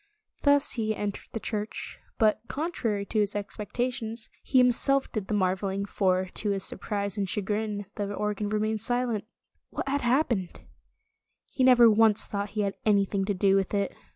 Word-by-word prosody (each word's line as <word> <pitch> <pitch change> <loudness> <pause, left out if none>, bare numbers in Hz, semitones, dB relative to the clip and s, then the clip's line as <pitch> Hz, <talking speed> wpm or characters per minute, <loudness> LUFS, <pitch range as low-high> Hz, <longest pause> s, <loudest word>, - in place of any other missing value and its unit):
Thus 285 0 +5
he 220 -2 0
entered 205 -1 -4
the 225 - -4
church, 215 -1 -4 0.2
but 215 -1 +3
contrary 240 -10 -2
to 215 - -1
his 205 -1 0
expectations, 225 +2 -3
he 265 - 0
himself 255 +2 +3
did 210 -4 -3
the 215 - -1
mar 185 -2 +2
veling, 195 +1 -3
for, 185 -2 +1
to 210 - -2
his 195 -1 -1
surprise 200 0 -4
and 195 -2 -1
chagrin, 210 +1 -2
the 205 -1 -2
organ 210 0 -2
remained 215 0 -1
silent. 245 -3 -1 0.4
What - - -5
had 285 +1 0
hap 255 +5 +2
pened 190 -7 -3 0.9
He 260 - 0
never 250 -2 +7
once 220 -1 +4
thought 200 0 -3
he - - +2
had 200 -1 -2
anything 200 -2 +2
to 205 0 -1
do 195 +1 +3
with 195 +1 0
it. 200 -1 -1
210 Hz, 175 wpm, -27 LUFS, 200-235 Hz, 0.9 s, never